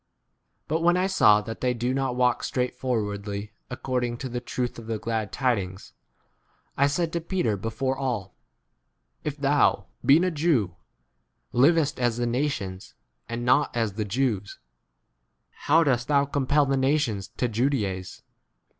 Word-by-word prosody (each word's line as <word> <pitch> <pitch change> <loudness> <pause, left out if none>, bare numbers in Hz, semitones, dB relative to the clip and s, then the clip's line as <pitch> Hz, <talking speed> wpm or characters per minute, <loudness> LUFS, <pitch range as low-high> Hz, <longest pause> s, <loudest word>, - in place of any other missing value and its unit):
But 160 +2 0
when 175 +1 +4
I 185 - +2
saw 110 - +5
that 115 +2 -7
they 125 -1 +1
do 120 +2 -1
not? 135 -2 -1
walk 125 -1 +2
straightforwardly, 105 -5 -2 0.2
according 125 -1 -2
to 130 - -5
the 125 0 -3
truth 125 -1 -3
of 115 - -11
the 115 -1 -2
glad 110 -1 -3
tidings, 100 -8 -2 0.8
I 140 - +3
said 160 +3 -1
to 170 - -1
Petar 165 - 0
before 115 +6 -2
all, 125 -8 -3 0.9
If 150 -1 -3
thou, 140 -8 +2 0.2
being 150 +6 +6
a 185 - +1
Jew, 145 - +1 0.8
livest 145 +2 +3
as 120 -2 +1
the 120 - 0
nations 120 -7 -3 0.3
and 115 +1 -3
not 130 0 +3
as 110 -4 0
the 105 +2 -2
Jews, 105 -2 -1 1.1
why 160 +3 +6
dost 125 -4 +1
thou 140 -1 +3
compel 145 +1 +2
the 135 0 +1
nations 130 -8 +1
to 125 - +1
ju 115 +2 0
s - - 0
daize 95 -8 -3
125 Hz, 155 wpm, -26 LUFS, 110-140 Hz, 1.1 s, being